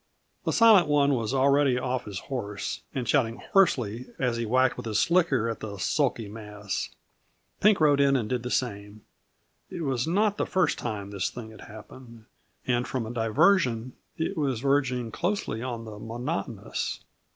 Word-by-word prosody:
The -, -, +1 dB
Silent 220 Hz, -7 st, +6 dB
One 145 Hz, -1 st, +3 dB
was 115 Hz, -3 st, -1 dB
already 135 Hz, 0 st, +3 dB
off 125 Hz, 0 st, -2 dB
his 100 Hz, -2 st, -6 dB
horse 105 Hz, -7 st, -4 dB
and 125 Hz, -3 st, -2 dB
shouting 115 Hz, -2 st, +2 dB, 0.2 s
hoarsely 125 Hz, -, +2 dB
as 125 Hz, -3 st, 0 dB
he 115 Hz, -1 st, -2 dB
whacked 130 Hz, +2 st, +3 dB
with -, -, -7 dB
his 110 Hz, -, 0 dB
slicker 155 Hz, -10 st, +2 dB
at 115 Hz, -1 st, -3 dB
the 105 Hz, -2 st, -6 dB
sulky 120 Hz, +1 st, 0 dB
mass. 105 Hz, -2 st, -5 dB, 0.7 s
Pink 210 Hz, 0 st, +4 dB
rode 145 Hz, -2 st, +4 dB
in 140 Hz, -1 st, +4 dB
and 120 Hz, -5 st, 0 dB
did 125 Hz, +1 st, -1 dB
the 125 Hz, -, -5 dB
same. 105 Hz, -4 st, -3 dB, 0.7 s
It 170 Hz, -, -5 dB
was 135 Hz, -2 st, -1 dB
not 205 Hz, +4 st, +2 dB
the -, -, -1 dB
first 185 Hz, -1 st, +1 dB
time 100 Hz, -4 st, -4 dB
this 100 Hz, -2 st, -1 dB
thing 115 Hz, -2 st, -9 dB
had 110 Hz, -, -13 dB
happened, 115 Hz, +1 st, -12 dB, 0.4 s
and 125 Hz, 0 st, 0 dB
from 130 Hz, -4 st, -2 dB
a 115 Hz, -, -6 dB
diversion 120 Hz, -, +2 dB, 0.2 s
it 160 Hz, -, -2 dB
was 135 Hz, -6 st, -1 dB
verging 130 Hz, -4 st, +1 dB
closely 175 Hz, -, -2 dB
on 120 Hz, -2 st, -4 dB
the 105 Hz, -1 st, -9 dB
monotonous. 115 Hz, -2 st, -4 dB
125 Hz, 170 wpm, -27 LUFS, 110-140 Hz, 0.7 s, Silent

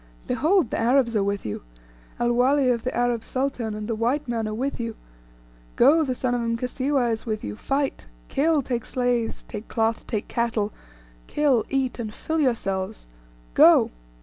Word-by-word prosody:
Behold, 330 Hz, -, +2 dB
the -, -, -1 dB
Arabs 235 Hz, 0 st, +3 dB
are 205 Hz, -, +3 dB
with 200 Hz, 0 st, -2 dB
you, 105 Hz, -, -4 dB, 0.6 s
El 240 Hz, 0 st, +2 dB
Wali 260 Hz, +2 st, +3 dB
of 235 Hz, -2 st, 0 dB
the 255 Hz, -, -2 dB
Arab 240 Hz, -2 st, +1 dB
sultan, 255 Hz, -5 st, -2 dB
and 210 Hz, 0 st, -5 dB
the 230 Hz, -, -1 dB
white 245 Hz, +6 st, 0 dB
man 230 Hz, -2 st, -1 dB
are 215 Hz, -, -3 dB
with 265 Hz, +4 st, -2 dB
you. 230 Hz, -1 st, -3 dB, 0.8 s
Go, 300 Hz, +6 st, +5 dB
the 260 Hz, -4 st, -1 dB
son 250 Hz, 0 st, -1 dB
of 245 Hz, -, 0 dB
Mkasiwa 250 Hz, +2 st, 0 dB
is 225 Hz, +2 st, -4 dB
with 215 Hz, -1 st, -2 dB
you; 105 Hz, -, -4 dB
fight; 275 Hz, -, -2 dB, 0.2 s
kill, 300 Hz, 0 st, +2 dB
take 240 Hz, -2 st, -2 dB
slaves, 245 Hz, -2 st, -1 dB
take 210 Hz, -1 st, -7 dB
cloth, 225 Hz, 0 st, -1 dB
take 210 Hz, -2 st, -2 dB
cattle, 225 Hz, -3 st, -1 dB, 0.5 s
kill, 280 Hz, -6 st, +2 dB
eat, 265 Hz, -2 st, -1 dB
and 220 Hz, -3 st, -4 dB
fill 320 Hz, 0 st, -2 dB
yourselves! 210 Hz, -7 st, -1 dB, 0.5 s
Go!" -, -, +6 dB
240 Hz, 175 wpm, -24 LUFS, 225-270 Hz, 0.8 s, Go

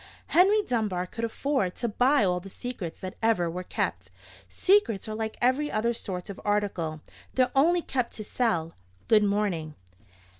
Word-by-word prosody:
Henry 400 Hz, +5 st, +5 dB
Dunbar 210 Hz, -, -1 dB
could 230 Hz, +5 st, -7 dB
afford 230 Hz, -5 st, -1 dB
to 240 Hz, -, -1 dB
buy 250 Hz, +4 st, +3 dB
all 180 Hz, -2 st, +1 dB
the 195 Hz, +2 st, -11 dB
secrets 210 Hz, -6 st, -6 dB
that 185 Hz, 0 st, -5 dB
ever 215 Hz, -7 st, +2 dB
were 180 Hz, +2 st, -4 dB
kept. 95 Hz, -, -3 dB, 0.4 s
Secrets 230 Hz, -, +2 dB
are 215 Hz, -, -4 dB
like 220 Hz, 0 st, -4 dB
every 260 Hz, +5 st, +2 dB
other 235 Hz, +2 st, +1 dB
sort 185 Hz, -5 st, -5 dB
of 200 Hz, -, -8 dB
article: 190 Hz, -7 st, -1 dB, 0.3 s
they're 255 Hz, -1 st, +3 dB
only 335 Hz, +5 st, +4 dB
kept 250 Hz, -3 st, -2 dB
to 215 Hz, -, -5 dB
sell. 175 Hz, -8 st, -1 dB, 0.4 s
Good 215 Hz, -2 st, +6 dB
morning." 200 Hz, -7 st, 0 dB
215 Hz, 160 wpm, -27 LUFS, 180-250 Hz, 0.4 s, Good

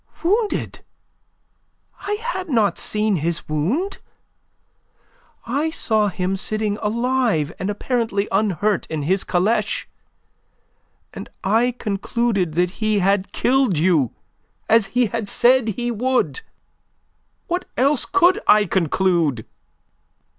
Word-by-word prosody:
"Wounded? 415 Hz, +5 st, 0 dB, 1.3 s
I 415 Hz, -, 0 dB
had 420 Hz, -5 st, -4 dB
not 225 Hz, -7 st, +1 dB
seen 210 Hz, -2 st, +1 dB
his 165 Hz, +1 st, -2 dB
wound. 200 Hz, -, -1 dB, 1.5 s
I 280 Hz, +7 st, -1 dB
saw 220 Hz, -9 st, +1 dB
him 190 Hz, -1 st, -2 dB
sitting 210 Hz, +1 st, -2 dB
alive 225 Hz, -, 0 dB
and 190 Hz, -, -2 dB
apparently 210 Hz, -1 st, -1 dB
unhurt 210 Hz, 0 st, 0 dB
in 155 Hz, -2 st, -3 dB
his 185 Hz, +6 st, +1 dB
caleche, 195 Hz, +6 st, 0 dB, 1.3 s
and -, -, -8 dB
I 230 Hz, +5 st, +2 dB
concluded 200 Hz, -4 st, -1 dB
that 180 Hz, +1 st, +1 dB
he 215 Hz, -1 st, +2 dB
had 195 Hz, 0 st, +1 dB
killed 255 Hz, -, +1 dB
you 155 Hz, -7 st, +2 dB, 0.5 s
as 225 Hz, -2 st, +4 dB
he 250 Hz, -, +5 dB
had 225 Hz, -1 st, -3 dB
said 250 Hz, -1 st, +3 dB
he 240 Hz, +3 st, -2 dB
would. 255 Hz, -, 0 dB, 1.0 s
What 360 Hz, +1 st, -2 dB
else 275 Hz, +1 st, +2 dB
could 370 Hz, -1 st, +3 dB
I 210 Hz, 0 st, +6 dB
conclude?" 170 Hz, -, 0 dB
215 Hz, 110 wpm, -21 LUFS, 190-250 Hz, 1.5 s, I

